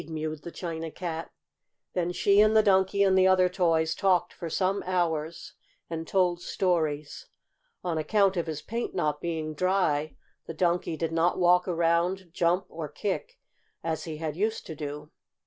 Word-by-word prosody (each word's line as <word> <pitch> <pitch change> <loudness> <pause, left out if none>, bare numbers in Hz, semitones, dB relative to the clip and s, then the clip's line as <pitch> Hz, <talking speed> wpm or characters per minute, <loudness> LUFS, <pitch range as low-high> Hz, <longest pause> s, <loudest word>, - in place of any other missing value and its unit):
mewed 155 -1 -4
the 170 - -7
China 165 -2 -5
Cat. 165 -1 -5 0.6
Then 175 -1 0
she 200 +3 +4
and 215 +1 +5
the 215 - +6
Donkey 195 0 +3
and 190 -1 +4
the 190 0 +5
other 185 -1 +5
toys 165 -3 +1
talked 180 -3 +1
for 170 - -6
some 190 +4 0
hours, 170 -3 -1 0.4
and 165 0 -4
told 180 -2 +1
stories. 155 -7 -1 0.6
On 170 -3 -1
account 195 +4 +2
of 170 -2 -1
his 155 -2 -4
paint 235 -1 -4
not 150 -5 0
being 160 -2 -3
dry 155 -3 +1 0.3
the 165 - -6
Donkey 170 -1 0
did 165 0 -2
not 165 +2 +2
walk 180 0 +4
around, 170 +1 +1
jump 175 +2 +1
or 160 -2 -6
kick 205 - -4 0.5
as 160 -1 -2
he 160 -2 -5
had 155 -1 -4
used 215 +5 -1
to 160 - -7
do. 150 0 -6
170 Hz, 165 wpm, -28 LUFS, 160-185 Hz, 0.6 s, the